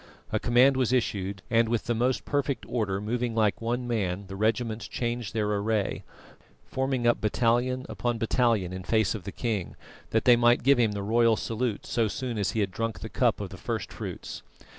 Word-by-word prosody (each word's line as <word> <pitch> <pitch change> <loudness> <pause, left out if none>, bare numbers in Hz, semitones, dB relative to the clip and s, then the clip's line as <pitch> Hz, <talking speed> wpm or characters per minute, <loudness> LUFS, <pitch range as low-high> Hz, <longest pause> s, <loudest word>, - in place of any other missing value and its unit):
A - - +1
command 125 +3 +4
was 130 -2 +1
issued, 100 -6 -1
and, 115 0 +3
with 115 -2 0
the 120 - -1
most 125 +3 0
perfect 140 -2 -1
order, 105 -5 -1
moving 115 +2 -2
like 110 -2 +1
one 120 +2 -2
man, 100 -5 -1
the 95 - -8
regiments 110 +2 -1
changed 120 -3 -3
their 110 -2 +1
array, 105 0 -1 0.6
forming 130 -2 -1
up 120 - +3
battalion 120 +4 +1
upon 120 -1 -2
battalion 115 -5 +1
in 95 0 -6
face 110 0 +2
of 105 -6 -7
the 100 - -4
king, 105 -7 -3 0.3
that 110 -1 +1
they 125 - +8
might 120 0 +4
give 135 0 +5
him 110 -3 +3
the 100 -1 -4
royal 115 +2 +3
salute 115 -1 -2
so 115 -2 +1
soon 115 +4 -3
as 100 - 0
he 110 - 0
had 100 -2 -1
drunk 115 +3 -3
the - - -6
cup - - +1
of - - -4
the - - -9
first - - -4
fruits. - - -6
115 Hz, 200 wpm, -27 LUFS, 105-120 Hz, 0.6 s, they